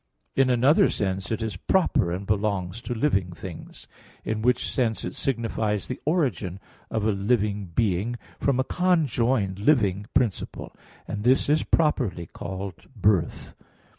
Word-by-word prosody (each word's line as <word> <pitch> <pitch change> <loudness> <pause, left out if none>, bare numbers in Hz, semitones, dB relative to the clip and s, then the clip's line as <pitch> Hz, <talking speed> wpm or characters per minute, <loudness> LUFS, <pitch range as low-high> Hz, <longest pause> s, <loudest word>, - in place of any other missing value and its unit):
In 135 -1 +4
another 140 - +5
sense 95 0 -2
it 110 0 -1
is 105 -4 -3
proper 105 - +2
and 95 +3 -3
belongs 100 -1 -1
to 120 - -4
living 100 -9 +1
things; 85 -1 -10 0.4
in 110 0 -1
which 125 +2 +2
sense 115 -4 -1
it - - -4
signifies 115 -5 -1
the 125 - -5
origin 120 - 0 0.3
of 110 -2 -1
a 110 - +3
living 105 0 0
being 100 +4 0 0.2
from 135 -2 +1
a - - +3
conjoined 130 - +1
living 105 -5 +2
principle; 120 -8 -1 0.3
and 105 -1 -4
this 130 +4 +3
is 155 +1 +4
properly 125 - +1
called 95 +2 -7
birth. 100 -5 +1
110 Hz, 140 wpm, -25 LUFS, 95-125 Hz, 0.4 s, another